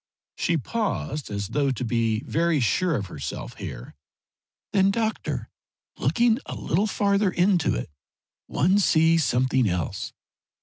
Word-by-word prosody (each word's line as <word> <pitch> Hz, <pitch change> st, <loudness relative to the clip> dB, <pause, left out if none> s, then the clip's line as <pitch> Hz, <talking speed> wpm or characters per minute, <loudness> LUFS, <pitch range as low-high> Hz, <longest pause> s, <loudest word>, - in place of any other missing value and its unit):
She 170 Hz, -2 st, +1 dB
paused, 145 Hz, -, -3 dB
as 100 Hz, -1 st, -3 dB
though 140 Hz, +3 st, +1 dB
to 130 Hz, -1 st, -2 dB
be 115 Hz, -2 st, 0 dB
very 165 Hz, 0 st, +1 dB
sure 160 Hz, -, +1 dB
of 105 Hz, -5 st, -2 dB
herself 70 Hz, -7 st, -6 dB
here. -, -, -7 dB, 0.8 s
"Then, 195 Hz, -1 st, +4 dB
doctor, 220 Hz, +1 st, -2 dB, 0.5 s
looking 235 Hz, 0 st, +2 dB
a -, -, -5 dB
little 195 Hz, +7 st, 0 dB
farther 200 Hz, -1 st, +2 dB
into 180 Hz, -1 st, +2 dB
it, -, -, -5 dB, 0.6 s
one 185 Hz, +6 st, +2 dB
sees 165 Hz, -3 st, +4 dB
something 130 Hz, -2 st, +2 dB
else. 90 Hz, -3 st, -3 dB
155 Hz, 130 wpm, -25 LUFS, -, 0.8 s, Then